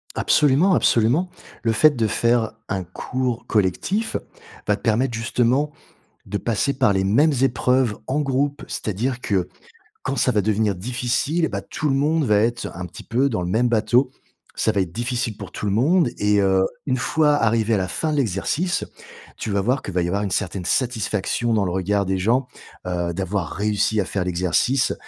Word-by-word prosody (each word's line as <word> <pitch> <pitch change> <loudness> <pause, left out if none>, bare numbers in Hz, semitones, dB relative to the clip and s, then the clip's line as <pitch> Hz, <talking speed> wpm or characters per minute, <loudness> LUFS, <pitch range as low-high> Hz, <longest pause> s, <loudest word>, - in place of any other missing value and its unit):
Absolument, 150 +6 +3
absolument. 130 +7 +2 0.3
Le 115 - +1
fait 150 +8 +5
de 115 -3 +1
faire 115 +1 +1 0.2
un 95 -1 -2
cours 125 +7 -3
collectif 115 - 0 0.5
va 105 - +3
te 100 - -15
permettre 120 +3 +1
justement 125 +5 +1 0.6
de 105 - -3
passer 120 +6 0
par 130 -5 +3
les 95 -1 +1
mêmes 140 +11 +3
épreuves 125 -3 +2
en 135 +3 0
groupe, 140 +1 -1
c'est - - -5
à - - +1
dire 120 +5 -2
que, 95 -6 -1 0.5
quand 140 - -2
ça 125 - +2
va 105 -2 +2
devenir 105 0 +1
difficile 125 - -1
et - - -2
bah, - - -4
tout 155 -3 -3
le 135 - +2
monde 150 +3 +1
va 105 -5 +3
être 115 +3 +1
un 90 - -6
petit 90 - -10
peu 130 +4 +1
dans 110 - -1
le 90 - -3
même 115 +6 +2
bateau. 120 +3 +2 0.5
Ça - - +1
va 100 -3 +1
être 90 -3 -6
difficile 120 0 -2
pour - - -8
tout - - -7
le 100 - 0
monde 140 - +3
et 105 0 +3
heu, 95 -1 +3 0.2
une 130 -2 0
fois 150 +4 +2
arrivé 115 -3 +2
à - - +3
la 90 -1 -1
fin 155 - -2
de 150 - 0
l'exercice, 140 - 0 0.5
tu - - -4
vas 100 -1 +1
voir 125 +6 0
qu'il 95 - -6
va 90 - +2
y - - 0
avoir 100 +4 -1
une 100 - -2
certaine 95 -1 -2
satisfaction 115 -1 0
dans 105 -2 +2
le 90 - -2
regard 100 +2 0
des 95 0 0
gens, 120 +8 +1 0.4
heu, 85 -1 -2
d'avoir 95 -2 -2
réussi 105 +2 0
à - - 0
faire 95 0 -2
l'exercice 90 +9 +1
115 Hz, 200 wpm, -22 LUFS, 100-130 Hz, 0.6 s, fait